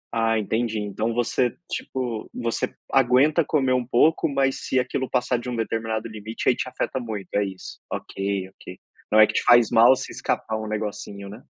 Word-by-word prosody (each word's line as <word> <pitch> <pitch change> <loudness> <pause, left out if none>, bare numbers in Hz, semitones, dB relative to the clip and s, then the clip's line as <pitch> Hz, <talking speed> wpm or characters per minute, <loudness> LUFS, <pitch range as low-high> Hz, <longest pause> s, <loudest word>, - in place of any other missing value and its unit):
Ah, 115 0 +2
entendi, 110 +1 -1
então 105 +3 -2
você, 120 +1 0
tipo, 120 -4 -4
você 115 -2 -2 0.2
aguenta 135 +5 +4
comer 135 -4 +1
um 125 -1 +1
pouco, 150 +6 +3
mas 135 -1 0
se 130 - +1
aquilo 130 +1 -2
passar 125 0 0
de 125 - -6
um 120 - -3
determinado 115 0 -2
limite, 110 +1 -6
aí 125 - +5
te 130 - -3
afeta 130 +1 -3
muito, 105 -6 -6
é 105 - +2
isso. 95 -1 -8
OK, 95 -1 -3
OK. 90 -1 -12 0.3
Não 110 - +5
é 110 - +10
que - - -4
te - - +1
faz 120 -2 +6
mal, 120 +3 +7
se - - -6
escapar 110 - -2
um 110 - -5
negocinho, 105 -2 -5
né. 110 +5 -11
115 Hz, 190 wpm, -24 LUFS, 110-125 Hz, 0.3 s, é